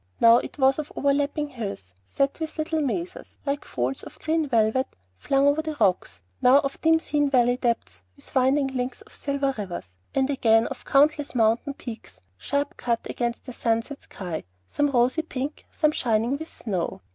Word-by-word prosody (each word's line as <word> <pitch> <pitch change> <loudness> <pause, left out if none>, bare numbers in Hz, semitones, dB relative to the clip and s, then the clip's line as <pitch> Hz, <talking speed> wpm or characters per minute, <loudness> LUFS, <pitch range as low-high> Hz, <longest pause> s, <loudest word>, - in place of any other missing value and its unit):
Now 230 0 +8
it - - -4
was 270 +1 +4
of 305 - -5
over 280 0 +2
lapping 290 +1 -1
hills 200 - -6
set 275 - -1
with 320 0 -5
little 315 0 -1
mésas, 345 - -3
like 280 0 -1
folds 125 +2 -2
of - - -11
green 320 -1 0
velvet 230 +2 +2 0.3
flung 275 0 +2
over 285 +2 +3
the 310 -1 -4
rocks; 180 - +1 0.2
now 255 +2 +7
of 275 0 -4
dim 325 0 +5
seen 290 -2 0
valley 245 -2 +4
depths 230 - -2
with - - -14
winding 270 +1 +3
links 255 -1 -4
of - - -19
silver 280 -1 -1
rivers; 175 - -5 0.3
and 265 -1 +3
again 225 -4 +4
of 270 - -6
countless 295 0 +3
mountain 235 +5 +2
peaks 220 - -9 0.2
sharp 280 - -2
cut 235 -2 -1
against 240 -1 -3
the 255 - -7
sunset 230 +4 -1
sky, 175 -5 -6 0.2
some 290 - 0
rosy 255 +3 +2
pink, 290 -2 -5
some 305 -2 +2
shining 235 -1 +1
with 320 +3 -5
snow. 190 - -3
265 Hz, 180 wpm, -25 LUFS, 230-290 Hz, 0.3 s, Now